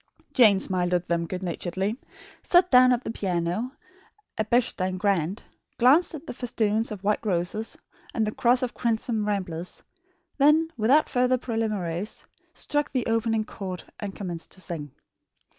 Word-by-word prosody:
Jane 215 Hz, -6 st, +6 dB
smiled 180 Hz, -2 st, 0 dB
at 175 Hz, 0 st, -1 dB
them 170 Hz, -1 st, 0 dB
good 185 Hz, +2 st, -5 dB
naturedly; 185 Hz, +4 st, -2 dB, 0.5 s
sat 360 Hz, 0 st, +4 dB
down 255 Hz, 0 st, +7 dB
at 245 Hz, 0 st, +1 dB
the -, -, -3 dB
piano, 185 Hz, +5 st, -2 dB, 0.6 s
a 215 Hz, -, 0 dB
Bechstein 205 Hz, -5 st, 0 dB
grand; 190 Hz, -1 st, 0 dB, 0.3 s
glanced 290 Hz, +8 st, +5 dB
at 310 Hz, +1 st, -9 dB
the -, -, -6 dB
festoons 225 Hz, -3 st, 0 dB
of 205 Hz, -2 st, -7 dB
white 210 Hz, +1 st, +1 dB
roses 195 Hz, +2 st, -2 dB, 0.3 s
and 225 Hz, -, 0 dB
the 210 Hz, -, -1 dB
cross 245 Hz, +1 st, +3 dB
of 250 Hz, -, -2 dB
crimson 225 Hz, -2 st, -1 dB
ramblers; 185 Hz, -4 st, -3 dB, 0.6 s
then, 310 Hz, +3 st, +4 dB
without 255 Hz, +8 st, +4 dB
further 250 Hz, 0 st, +2 dB
preliminaries, 215 Hz, -6 st, -3 dB, 0.3 s
struck 295 Hz, -1 st, -1 dB
the 255 Hz, -3 st, -1 dB
opening 225 Hz, -1 st, +1 dB
chord 185 Hz, -4 st, -6 dB, 0.2 s
and 200 Hz, -2 st, -5 dB
commenced 175 Hz, -4 st, -6 dB
to 185 Hz, -, -8 dB
sing. 165 Hz, -4 st, -5 dB
215 Hz, 150 wpm, -26 LUFS, 185-245 Hz, 0.6 s, down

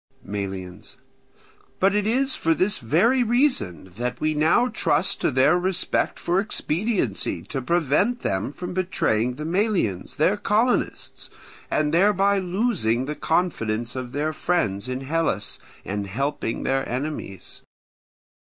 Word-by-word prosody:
Melians. 95 Hz, -3 st, -6 dB, 0.8 s
But 195 Hz, +1 st, +4 dB
it 210 Hz, 0 st, +1 dB
is 265 Hz, +4 st, +1 dB
for 165 Hz, 0 st, +1 dB
this 200 Hz, +5 st, +1 dB
very 185 Hz, -, +3 dB
reason 240 Hz, -, +1 dB
that 125 Hz, +1 st, -3 dB
we 155 Hz, 0 st, +1 dB
now 160 Hz, +11 st, +3 dB
trust 155 Hz, -10 st, +1 dB
to -, -, +2 dB
their 140 Hz, +6 st, +4 dB
respect 185 Hz, 0 st, -1 dB
for 175 Hz, +2 st, +1 dB
expediency 180 Hz, -, -1 dB
to 135 Hz, -, -4 dB
prevent 175 Hz, -, +1 dB
them 95 Hz, +6 st, -1 dB
from 180 Hz, +4 st, -6 dB
betraying 125 Hz, -10 st, 0 dB
the 150 Hz, -, -6 dB
Melians, 175 Hz, -, 0 dB
their 185 Hz, +7 st, +2 dB
colonists, 220 Hz, +4 st, 0 dB, 0.4 s
and 155 Hz, 0 st, +1 dB
thereby 200 Hz, +2 st, +4 dB
losing 180 Hz, -, 0 dB
the 150 Hz, -, -3 dB
confidence 120 Hz, -11 st, -1 dB
of 125 Hz, -1 st, -5 dB
their 150 Hz, +3 st, -1 dB
friends 110 Hz, -, 0 dB
in 130 Hz, +1 st, -3 dB
Hellas 135 Hz, -9 st, -1 dB, 0.3 s
and 100 Hz, +1 st, -3 dB
helping 135 Hz, +2 st, -2 dB
their 135 Hz, 0 st, 0 dB
enemies. 145 Hz, +5 st, -5 dB
155 Hz, 130 wpm, -24 LUFS, 120-195 Hz, 0.8 s, But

